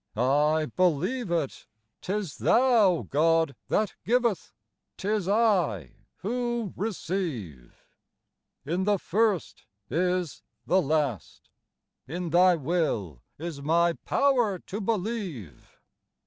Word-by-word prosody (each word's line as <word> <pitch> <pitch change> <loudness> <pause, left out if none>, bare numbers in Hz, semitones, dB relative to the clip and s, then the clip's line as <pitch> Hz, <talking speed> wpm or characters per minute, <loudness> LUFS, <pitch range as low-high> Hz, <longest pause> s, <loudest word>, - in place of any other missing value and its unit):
*'I 150 +5 +2
believe 185 - +1
it! 165 -5 -2 0.3
'Tis 195 -4 -3
Thou, 230 -9 +4
God, 160 -1 +2
that 210 -2 0
giveth, 235 -5 0 0.5
'tis 205 -1 -1
1 185 - +2 0.3
who 240 -1 -2
receive; 165 - -4 0.8
In 175 +6 -1
the 205 -1 +3
first 205 -1 -1 0.3
is 180 +1 -1 0.2
the 190 +1 +3
last, 145 - -2 0.6
in 170 +3 -4
Thy 180 +1 +5
will 135 - -2 0.2
is 160 -2 -6
my 170 +3 +2
power 245 -3 +1
to 200 +4 -7
believe 195 - -4
180 Hz, 95 wpm, -27 LUFS, 150-210 Hz, 0.8 s, Thy